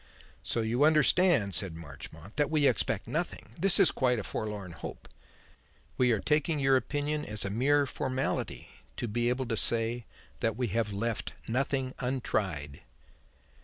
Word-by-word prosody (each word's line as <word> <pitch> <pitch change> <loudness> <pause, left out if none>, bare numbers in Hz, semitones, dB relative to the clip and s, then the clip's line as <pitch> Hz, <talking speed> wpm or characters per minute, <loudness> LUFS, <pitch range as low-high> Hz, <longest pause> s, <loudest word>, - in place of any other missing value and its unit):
"So 115 - -1
you 115 +5 +1
understand," 155 - +4
said 90 0 0
Marchmont, 80 +4 -10
"that 145 -1 +2
we 155 -2 +2
expect 110 -5 +1
nothing. 150 - -3
This 190 +2 +3
is - - +6
quite 125 -2 +1
a 105 - -3
forlorn 105 -4 -4
hope. - - -8 0.9
We 125 -1 +3
are 110 - +2
taking 150 - +1
your 135 -1 +4
opinion 145 +3 -1
as 105 -1 -4
a 100 - -2
mere 140 +6 +3
formality, 130 0 -3 0.3
to 120 - -2
be 120 +2 0
able 130 +1 -1
to 115 - -1
say 115 +1 +3 0.3
that 115 -2 0
we 125 -3 -1
have 110 +1 0
left 110 +2 -2
nothing 130 +2 -1
untried." 100 - -2
120 Hz, 155 wpm, -30 LUFS, 105-140 Hz, 0.9 s, is